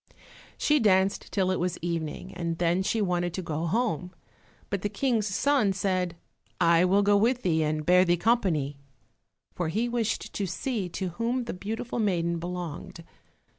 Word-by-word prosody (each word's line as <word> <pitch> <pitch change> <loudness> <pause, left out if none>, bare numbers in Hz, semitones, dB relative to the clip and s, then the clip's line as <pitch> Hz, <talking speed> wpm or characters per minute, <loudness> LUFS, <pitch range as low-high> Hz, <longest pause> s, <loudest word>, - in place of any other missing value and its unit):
She 300 0 +3
danced 195 -3 +2
till 190 -2 +1
it 185 - 0
was 180 0 -1
evening, 170 +1 -4
and 170 -1 -3
then 175 +2 +2
she 210 +3 0
wanted 175 -2 -1
to 185 - -3
go 160 +1 -2
home. 185 -4 -1 0.6
But 200 -2 -1
the 205 - -1
King's 220 0 0
son 215 +1 +2
said, 185 -2 -1 0.4
"I 170 0 +5
will 195 +3 +3
go 205 0 +4
with 240 +5 +2
thee 160 -3 +2
and 155 0 -1
bear 180 +2 +6
thee 175 -1 +2
company," 170 - +1 0.7
for 175 - -2
he 215 +9 0
wished 235 -2 -2
to 200 - -2
see 200 0 -2
to 185 +1 -3
whom 235 +8 -1
the 235 - -5
beautiful 220 +6 -4
maiden 170 -5 0
belonged. 175 -1 -6
185 Hz, 170 wpm, -27 LUFS, 170-215 Hz, 0.7 s, bear